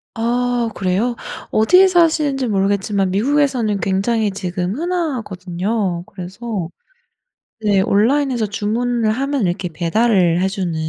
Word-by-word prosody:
아 240 0 0
그래요? 200 +6 0 0.4
어디에 365 - +5
사시는지 310 -7 +2
모르겠지만 195 -1 0
미국에서는 245 -2 +1
굉장히 205 +2 0
지금 185 0 -3
흔하거든요. 210 - -2
그래서 190 0 -6 0.9
네 205 -3 +2
온라인에서 240 +4 +2
주문을 220 +3 -1
하면 270 -3 -1
이렇게 175 0 -2
배달을 175 0 +2
해 190 - +2
주는 190 -4 -3
215 Hz, 300 characters per minute, -19 LUFS, 190-245 Hz, 0.9 s, 어디에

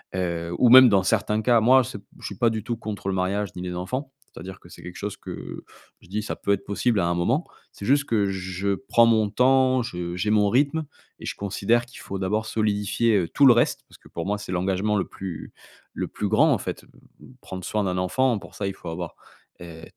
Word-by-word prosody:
Heu, 85 -2 -2
ou 125 - +5
même 130 +1 +10
dans 100 -3 +3
certains 105 +1 +1
cas, 120 0 +4
moi, 130 +3 +6
c'est 120 -4 -7
p 100 - -24
je - - -10
suis 100 - -5
pas 115 - +3
du 110 -2 -3
tout 120 +1 -3
contre 105 -3 -6
le - - -1
mariage 95 +2 -1
ni 90 - -6
les 90 -1 -5
enfants, 130 +10 -4 0.2
c'est-à-dire 95 +1 -9
que 85 - -16
c'est - - -13
quelque 90 0 -9
chose 105 0 -5
que - - -8 0.4
je - - -20
dis: 105 +4 -3
«Ça - - -4
peut 100 - +1
être 100 - -2
possible 105 +2 0
à - - +1
un 85 - +1
moment». 120 - 0 0.3
C'est 100 - -9
juste 145 +4 +3
que 105 -5 +1
je 95 +1 -2
prends 120 0 +3
mon 110 -2 +3
temps, 130 +2 +3
je 85 -5 -5
j'ai 90 +4 -1
mon 105 -1 +3
rythme 140 +6 +1 0.3
et - - -9
je - - -4
considère 100 +4 0
qu'il 120 - -14
faut 100 - -6
d'abord 105 +4 -1
solidifier, 105 +1 +1
heu, 90 -4 0
tout 140 - +3
le 130 - +9
reste, 120 - +1
parce - - -17
que - - -18
pour - - -6
moi, 105 +2 -1
c'est 105 -3 -7
l'engagement 95 +3 0
le 100 - 0
plus 90 -4 -8 0.4
le - - -3
plus - - -4
grand, - - +4
en - - +1
fait. - - -6
B - - -24 0.2
b - - -15
prendre 95 -1 -8
soin 105 -1 -1
d'un 90 -2 -1
enfant, 115 +6 +1
pour - - -14
ça, 100 - -4
il 95 - -3
faut 90 - -12
avoir, 85 +1 -6 0.5
heu, 80 -2 -10
105 Hz, 245 wpm, -24 LUFS, 95-120 Hz, 0.5 s, même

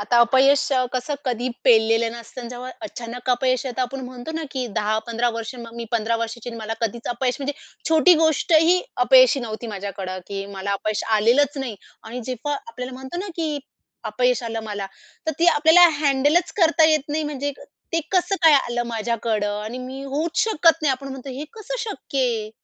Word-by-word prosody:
आता 225 +4 +2
अपयश 265 +4 +4 0.3
कसं 255 +4 -1
कधी 245 0 -1 0.2
पेललेलं 225 -1 +4
नसतं 235 +2 -10
आणि 240 - -7
जेव्हा 250 +1 -7
अचानक 245 -4 -5
अपयश 255 0 +1
येत, 255 0 -5
आपण 265 +1 -2
म्हणतो 250 +4 -7
ना, 325 0 -3
की 260 -3 -3
10-15 225 +3 0
वर्ष 230 +2 -5
मग 235 -1 -10
मी 235 - -4
15 230 0 +1
वर्षाची 230 +1 -5
आणि 230 - -8
मला 220 0 -4
कधीच 230 +1 -3
अपयश 245 +1 -1
म्हणजे 280 +1 -2 0.4
छोटी 325 +3 +6
गोष्टही 325 +3 +4 0.2
अपयशी - - +6
नव्हती 230 0 -5
माझ्याकडं, 195 -2 -5
की 195 -1 -4
मला 195 +1 -3
अपयश 215 +1 -2 0.2
आलेलंच 260 +7 +3
नाही 245 -6 -4 0.3
आणि 245 +2 -7
जेव्हा 255 +3 -3
आपल्याला 255 -3 -6
म्हणतो 265 +6 -7
ना, 400 - -5
की 310 -3 -1 0.5
अपयश 245 +3 +1
आलं 225 -1 -3
मला, 205 -2 -4 0.4
तर 315 - +1
ती 340 - +3
आपल्याला 335 +3 +7
हँडलच 290 +4 +2
करता 335 -4 +4
येत 305 -2 +1
नाही 310 +1 -1
म्हणजे 285 -1 -3 0.4
ते 330 - +2
कसं 370 +1 +2
काय 320 -2 +8
आलं 240 -3 +1
माझ्याकडं 220 -2 -1
आणि 225 +4 -6
मी 260 +2 -7
होऊच 300 +5 -1
शकत 330 -7 +3
नाही, 300 - +3
आपण 275 +1 -6
म्हणतो 265 0 -7
हे 275 +4 -5
कसं 450 +2 -6
शक्य 385 - -5
आहे. 230 -4 0
255 Hz, 185 wpm, -22 LUFS, 230-295 Hz, 0.5 s, काय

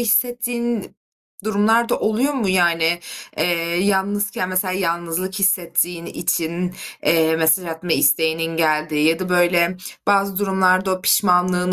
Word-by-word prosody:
hissettiğin 240 -1 -1 0.5
durumlar 220 +2 +2
da - - 0
oluyor 240 +7 0
mu? 230 -8 -1
Yani, 170 -2 +2 0.4
eee, - - +1 0.4
yalnızken 200 -1 -1
mesela 185 0 -1
yalnızlık 170 0 -2
hissettiğin 180 -3 0
için, 175 +1 -2 0.3
eee, 160 0 +2
mesaj 160 +3 +2
atma 165 +1 -4
isteğinin 160 +3 +1
geldiği 155 -2 +1
ya 165 0 +1
da 185 - -4
böyle 175 0 +2 0.3
bazı 200 -1 +2
durumlarda 190 -1 +2
o 185 - -7
pişmanlığın 180 -1 +2
185 Hz, 125 wpm, -20 LUFS, 165-200 Hz, 0.5 s, durumlar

